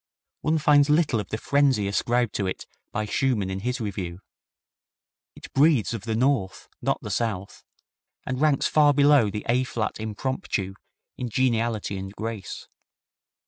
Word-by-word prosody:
One 155 Hz, +1 st, +1 dB
finds 145 Hz, -1 st, +4 dB
little 150 Hz, -6 st, +3 dB
of 105 Hz, -, -5 dB
the 110 Hz, -, -2 dB
frenzy 135 Hz, -5 st, +2 dB
ascribed 120 Hz, +3 st, 0 dB
to 100 Hz, -, -1 dB
it 95 Hz, -, -4 dB, 0.3 s
by 105 Hz, +1 st, -2 dB
Schumann 105 Hz, -4 st, 0 dB
in 95 Hz, -, -3 dB
his 125 Hz, +5 st, -2 dB
review. 95 Hz, -5 st, -4 dB, 1.2 s
It -, -, -12 dB
breathes 140 Hz, -5 st, +3 dB
of 110 Hz, -2 st, -5 dB
the 110 Hz, -1 st, -1 dB
North, 120 Hz, -6 st, 0 dB
not -, -, 0 dB
the 105 Hz, -, -5 dB
South, 100 Hz, -2 st, -3 dB, 0.6 s
and 130 Hz, +1 st, -3 dB
ranks 150 Hz, -3 st, +3 dB
far 145 Hz, -2 st, +4 dB
below 140 Hz, -6 st, +5 dB
the 105 Hz, +1 st, -5 dB
A 125 Hz, +2 st, +2 dB
flat 115 Hz, -4 st, -3 dB
Impromptu 110 Hz, -, -3 dB, 0.5 s
in 125 Hz, -, -3 dB
geniality 115 Hz, -4 st, 0 dB
and 95 Hz, 0 st, -6 dB
grace. 110 Hz, -3 st, -6 dB
115 Hz, 150 wpm, -25 LUFS, 105-135 Hz, 1.2 s, below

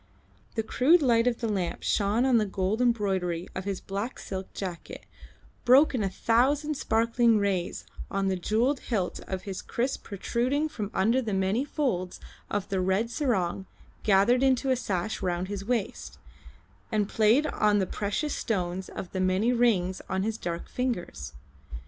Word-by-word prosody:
The 225 Hz, -, 0 dB
crude 295 Hz, +9 st, +4 dB
light 235 Hz, -2 st, +3 dB
of 245 Hz, -1 st, 0 dB
the 230 Hz, -, 0 dB
lamp 190 Hz, -5 st, -2 dB
shone 210 Hz, +4 st, +2 dB
on 255 Hz, -3 st, +4 dB
the 215 Hz, -, +1 dB
gold 195 Hz, +4 st, -1 dB
embroidery 190 Hz, -7 st, 0 dB
of 185 Hz, -, -5 dB
his 195 Hz, -2 st, -2 dB
black 200 Hz, +6 st, -4 dB
silk 190 Hz, -1 st, -6 dB
jacket, 180 Hz, -4 st, -6 dB, 0.6 s
broke 270 Hz, +5 st, +6 dB
in 250 Hz, -, 0 dB
a 195 Hz, -, 0 dB
thousand 275 Hz, +9 st, +1 dB
sparkling 230 Hz, -2 st, +2 dB
rays 195 Hz, -4 st, -1 dB, 0.2 s
on 195 Hz, 0 st, -1 dB
the 190 Hz, -, +1 dB
jewelled 230 Hz, +9 st, +1 dB
hilt 195 Hz, -7 st, -2 dB
of 190 Hz, -1 st, -4 dB
his 195 Hz, -2 st, -5 dB
kriss 255 Hz, +3 st, -2 dB
protruding 250 Hz, +9 st, -1 dB
from 210 Hz, -8 st, -5 dB
under 230 Hz, +7 st, +3 dB
the 215 Hz, -5 st, -2 dB
many 190 Hz, +6 st, +1 dB
folds 240 Hz, -, -2 dB, 0.3 s
of 205 Hz, -1 st, -2 dB
the 190 Hz, -2 st, 0 dB
red 190 Hz, +5 st, +1 dB
sarong 195 Hz, -, -1 dB, 0.3 s
gathered 215 Hz, +5 st, +4 dB
into 265 Hz, 0 st, +2 dB
a -, -, +4 dB
sash 210 Hz, -3 st, -2 dB
round 180 Hz, 0 st, -1 dB
his 200 Hz, -1 st, -4 dB
waist, 230 Hz, -1 st, -3 dB, 0.7 s
and 210 Hz, -2 st, +1 dB
played 225 Hz, +8 st, +3 dB
on 210 Hz, -7 st, +2 dB
the 195 Hz, -, +2 dB
precious 210 Hz, -, -2 dB
stones 185 Hz, -3 st, -2 dB
of 175 Hz, -, -7 dB
the 185 Hz, -, -2 dB
many 190 Hz, +6 st, +2 dB
rings 195 Hz, -7 st, +2 dB
on 190 Hz, 0 st, 0 dB
his 220 Hz, +1 st, -1 dB
dark 170 Hz, -5 st, -5 dB
fingers. 220 Hz, -, -3 dB
210 Hz, 165 wpm, -27 LUFS, 190-245 Hz, 0.7 s, broke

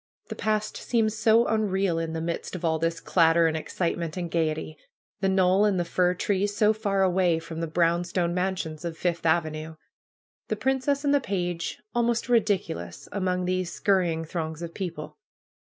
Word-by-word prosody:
The -, -, -5 dB
past 215 Hz, 0 st, -1 dB
seemed 225 Hz, -3 st, +1 dB
so 225 Hz, +1 st, +4 dB
unreal, 195 Hz, -5 st, +1 dB
in 165 Hz, -1 st, -3 dB
the 165 Hz, -, -3 dB
midst 170 Hz, +2 st, -4 dB
of 180 Hz, -1 st, -4 dB
all 160 Hz, -1 st, +1 dB
this 165 Hz, 0 st, -1 dB
clatter, 165 Hz, -1 st, +4 dB
and 160 Hz, -1 st, +1 dB
excitement 170 Hz, +1 st, -2 dB
and 175 Hz, -2 st, -4 dB
gayety; 155 Hz, -1 st, -1 dB, 0.4 s
the 195 Hz, -1 st, +1 dB
knoll 190 Hz, +1 st, +4 dB
and 205 Hz, -3 st, +2 dB
the 175 Hz, -, 0 dB
fir 180 Hz, +1 st, +1 dB
trees 200 Hz, +2 st, 0 dB
so 215 Hz, 0 st, +4 dB
far 200 Hz, -3 st, 0 dB
away 180 Hz, -2 st, +3 dB
from 165 Hz, 0 st, -7 dB
the 165 Hz, -, -1 dB
brown 170 Hz, +1 st, +2 dB
stone 175 Hz, -1 st, -1 dB
mansions 180 Hz, -4 st, -2 dB
of 170 Hz, -1 st, -4 dB
Fifth 170 Hz, -1 st, -1 dB
Avenue; 160 Hz, -1 st, 0 dB, 0.7 s
the 215 Hz, -, -1 dB
princess 265 Hz, +5 st, 0 dB
and 285 Hz, -, +3 dB
the 285 Hz, -, +3 dB
page 175 Hz, -6 st, -3 dB
almost 235 Hz, 0 st, 0 dB
ridiculous 195 Hz, -, 0 dB
among 185 Hz, -2 st, -1 dB
these 185 Hz, -1 st, -1 dB
scurrying 175 Hz, -5 st, +1 dB
throngs 160 Hz, 0 st, -4 dB
of 170 Hz, 0 st, -6 dB
people. 170 Hz, -6 st, -6 dB
180 Hz, 175 wpm, -26 LUFS, 165-200 Hz, 0.7 s, so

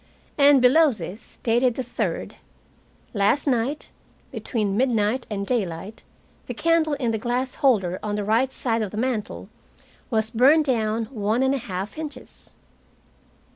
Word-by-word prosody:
And 280 Hz, -2 st, +5 dB
below 300 Hz, +4 st, +6 dB
this, 200 Hz, -1 st, -9 dB
dated 240 Hz, +1 st, +2 dB
the 260 Hz, -, -3 dB
third: 245 Hz, -, -4 dB, 0.8 s
Last 205 Hz, +7 st, +2 dB
night, 265 Hz, +2 st, -1 dB, 0.4 s
between 210 Hz, -5 st, -2 dB
midnight 235 Hz, 0 st, +1 dB
and 200 Hz, -2 st, -3 dB
daylight, 200 Hz, -3 st, -3 dB, 0.5 s
the -, -, -5 dB
candle 330 Hz, -2 st, +2 dB
in 250 Hz, -5 st, -1 dB
the 220 Hz, -, -2 dB
glass 250 Hz, +3 st, -2 dB
holder 195 Hz, -, +2 dB
on 210 Hz, -1 st, -3 dB
the 210 Hz, -, -2 dB
right 235 Hz, +5 st, +2 dB
side 230 Hz, -4 st, -1 dB
of 210 Hz, -, -2 dB
the 210 Hz, -, -8 dB
mantel 235 Hz, -3 st, -3 dB, 0.6 s
was 220 Hz, -3 st, 0 dB
burned 275 Hz, +7 st, +5 dB
down 225 Hz, -3 st, 0 dB
one 220 Hz, +1 st, 0 dB
and 265 Hz, +1 st, +2 dB
one 275 Hz, -, -2 dB
half 195 Hz, +5 st, -5 dB
inches. 305 Hz, -2 st, -9 dB
235 Hz, 145 wpm, -24 LUFS, 210-265 Hz, 0.8 s, below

